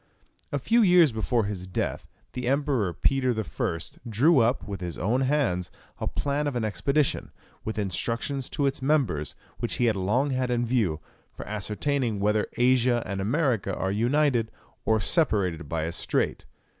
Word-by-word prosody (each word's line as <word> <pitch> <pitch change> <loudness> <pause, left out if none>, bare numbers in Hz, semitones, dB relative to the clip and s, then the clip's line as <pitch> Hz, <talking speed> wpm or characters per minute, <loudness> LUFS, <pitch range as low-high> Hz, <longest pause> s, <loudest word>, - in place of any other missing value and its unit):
A - - 0
few 235 +1 +3
years 180 - +6
before 110 +1 0
his 100 -3 -4
death 95 - -3 0.3
the 125 -1 -4
Emperor 135 -8 +1
Peter 130 +3 +1
I. 85 -5 -2 0.3
drew 135 +8 +4
up, 120 +2 +1
with 100 -3 -5
his 85 -2 -5
own 115 +10 +1
hands, 130 -11 +1 0.3
a - - -2
plan 145 +1 -1
of 140 - -2
an 120 - -1
expedition, 135 +9 0 0.3
with 110 - -4
instructions 115 +7 -2
to 145 - -1
its 135 0 -1
members, 130 - 0 0.2
which - - -1
he 120 - +1
had 110 -2 +2
long 105 +9 +1
had 130 -1 0
in 120 0 +1
view, 110 -11 0 0.3
for - - -9
ascertaining 110 +3 -1
whether 105 +1 +1
Asia 125 -1 +3
and 100 -1 -3
America 115 - 0
are 95 - -1
united, 120 +2 +2 0.4
or 110 0 +3
separated 95 - +1
by 80 -1 -1
a 80 - -2
strait. - - -1
120 Hz, 165 wpm, -26 LUFS, 100-135 Hz, 0.4 s, years